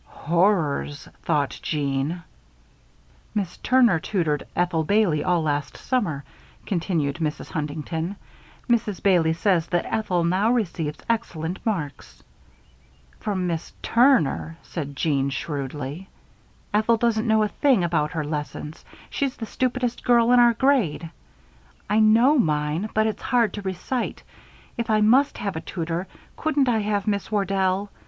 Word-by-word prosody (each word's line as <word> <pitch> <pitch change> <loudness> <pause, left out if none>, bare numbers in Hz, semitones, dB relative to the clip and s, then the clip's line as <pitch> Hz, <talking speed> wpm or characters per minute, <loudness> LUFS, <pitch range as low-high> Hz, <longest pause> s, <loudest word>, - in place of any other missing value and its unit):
"Horrors!" 165 -4 0
thought 145 -4 0
Jeanne. 145 +3 -2 1.1
"Miss 195 -4 -2
Turner 240 -9 +4
tutored 155 -5 -1
Ethel 175 -2 +1
Bailey 190 -4 +2
all 175 -3 +1
last 145 -2 -2
summer," 185 - -1 0.4
continued 165 -6 -1
Mrs. 155 -3 -3
Huntington. 160 +4 -3 0.5
"Mrs. 220 -5 0
Bailey 175 -5 +4
says 170 -1 +1
that 175 -1 0
Ethel 185 -6 0
now 185 +6 +2
receives 170 -10 -1
excellent 185 -7 -2
marks." 155 - -4 1.0
"From 190 -3 -2
Miss 170 -2 -3
Turner," 230 - +3
said 145 -4 -6
Jeanne, 140 -2 +1
shrewdly. 145 +4 -5 0.6
"Ethel 220 +2 +3
doesn't 230 0 +1
know 220 -1 +4
a - - +2
thing 255 -3 +2
about 165 -1 0
her 160 -3 -1
lessons. 150 +1 -5 0.3
She's 275 -2 -2
the 225 - -5
stupidest 250 +1 -2
girl 240 -1 +4
in 250 - +6
our 240 -1 +6
grade. 210 - +1 0.8
I 215 - +4
know 230 +7 +5
mine, 155 +2 0
but 215 0 +3
it's 220 - -2
hard 235 -6 +2
to 205 - -5
recite. 195 +6 -3 0.6
If 235 0 -2
I 215 -1 +3
must 260 +7 +4
have 200 -3 -3
a 160 - -3
tutor, 170 +1 -4 0.3
couldn't 295 -4 +1
I 225 -2 +2
have 205 -1 -1
Miss 200 0 -1
Wardell? 195 -1 0
185 Hz, 135 wpm, -24 LUFS, 160-220 Hz, 1.1 s, in